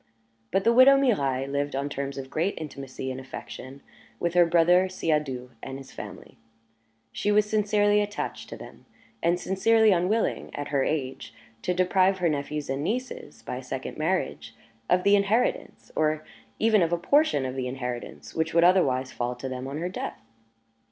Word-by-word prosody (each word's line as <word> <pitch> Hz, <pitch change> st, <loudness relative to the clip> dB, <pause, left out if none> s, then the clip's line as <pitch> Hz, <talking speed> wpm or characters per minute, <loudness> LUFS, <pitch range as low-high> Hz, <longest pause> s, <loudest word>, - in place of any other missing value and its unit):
But 195 Hz, +1 st, +1 dB
the 230 Hz, +2 st, +4 dB
widow 260 Hz, +3 st, +8 dB
Mirailhe 140 Hz, -, +1 dB
lived 140 Hz, 0 st, -2 dB
on 140 Hz, +1 st, -1 dB
terms 140 Hz, -1 st, -4 dB
of 135 Hz, -1 st, -7 dB
great 175 Hz, +6 st, 0 dB
intimacy 135 Hz, -3 st, -6 dB
and 130 Hz, -, -5 dB
affection 130 Hz, +1 st, -9 dB, 0.4 s
with 170 Hz, -1 st, -1 dB
her 175 Hz, -1 st, +5 dB
brother 175 Hz, +2 st, +4 dB
Siadoux 150 Hz, -8 st, -2 dB
and 135 Hz, 0 st, -6 dB
his 135 Hz, -1 st, -11 dB
family; -, -, -10 dB, 0.7 s
she 205 Hz, -, -1 dB
was 210 Hz, 0 st, +4 dB
sincerely 210 Hz, -1 st, +3 dB
attached 205 Hz, 0 st, -4 dB
to -, -, -7 dB
them, -, -, -13 dB, 0.3 s
and 170 Hz, +1 st, +2 dB
sincerely 220 Hz, +4 st, +3 dB
unwilling, 190 Hz, +5 st, +1 dB
at 145 Hz, 0 st, -4 dB
her 140 Hz, -2 st, +1 dB
age, 135 Hz, -4 st, -3 dB, 0.3 s
to 180 Hz, -, -1 dB
deprive 185 Hz, +1 st, +3 dB
her 175 Hz, -2 st, +1 dB
nephews 150 Hz, 0 st, -3 dB
and 135 Hz, +2 st, -2 dB
nieces, 250 Hz, +8 st, -4 dB
by -, -, -5 dB
a -, -, -7 dB
second -, -, -5 dB
marriage, -, -, -2 dB, 0.3 s
of 180 Hz, 0 st, +3 dB
the 200 Hz, 0 st, +5 dB
inheritance, 205 Hz, +5 st, 0 dB
or 155 Hz, 0 st, +1 dB, 0.3 s
even 220 Hz, -2 st, +4 dB
of 165 Hz, -1 st, +2 dB
a 175 Hz, -, +2 dB
portion 175 Hz, -, +2 dB
of 130 Hz, 0 st, -4 dB
the 130 Hz, -1 st, -2 dB
inheritance, 125 Hz, -, -6 dB
which 160 Hz, 0 st, -1 dB
would 170 Hz, -, +6 dB
otherwise 135 Hz, -8 st, +3 dB
fall 125 Hz, 0 st, -3 dB
to 125 Hz, +2 st, -6 dB
them 130 Hz, 0 st, -5 dB
on 140 Hz, +2 st, -5 dB
her 170 Hz, +3 st, -2 dB
death. -, -, -5 dB
165 Hz, 175 wpm, -26 LUFS, 135-200 Hz, 0.7 s, widow